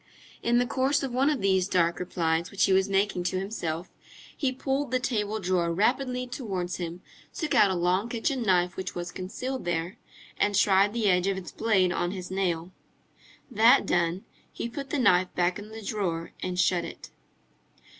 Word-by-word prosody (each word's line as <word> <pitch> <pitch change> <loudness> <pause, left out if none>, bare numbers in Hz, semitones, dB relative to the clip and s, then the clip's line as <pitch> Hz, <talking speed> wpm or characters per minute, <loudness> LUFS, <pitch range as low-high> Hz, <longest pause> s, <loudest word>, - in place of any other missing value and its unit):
In 240 +1 +2
the 245 - +3
course 270 +3 +1
of 270 - -2
one 265 +3 +3
of 290 -7 -1
these 190 -1 +2
dark 170 -3 +1
replies 170 -1 -1
which 200 - 0
he 195 - +2
was 190 +1 +3
making 195 -2 +1
to 185 +1 0
himself, 175 -4 -4 0.4
he 270 -3 0
pulled 270 +2 -2
the 255 +1 +1
table 220 -4 -1
drawer 180 -3 0
rapidly 250 +7 0
towards 200 -9 -4
him, 175 0 -6 0.3
took 310 -3 -2
out 200 - +6
a 190 - 0
long 180 +5 +1
kitchen 250 +3 -1
knife 180 -4 +2
which 185 0 -5
was 175 0 -4
concealed 250 +8 -5
there, 175 +1 -2 0.4
and 205 0 +2
tried 200 +1 +4
the 230 -3 0
edge 180 -1 +3
of 195 -1 0
its 180 -3 -7
blade 195 -5 +2
on 175 - -1
his 185 -1 -6
nail. 180 -2 -1 0.8
That 225 +1 +5
done, 175 +2 0 0.3
he - - -4
put 275 +3 -7
the 295 - -1
knife 185 -8 +3
back 180 +2 +1
in 205 +1 -10
the 220 0 -9
drawer 180 -6 -2
and 180 -1 -3
shut 180 -2 +2
it. - - -9
195 Hz, 185 wpm, -27 LUFS, 180-235 Hz, 0.8 s, out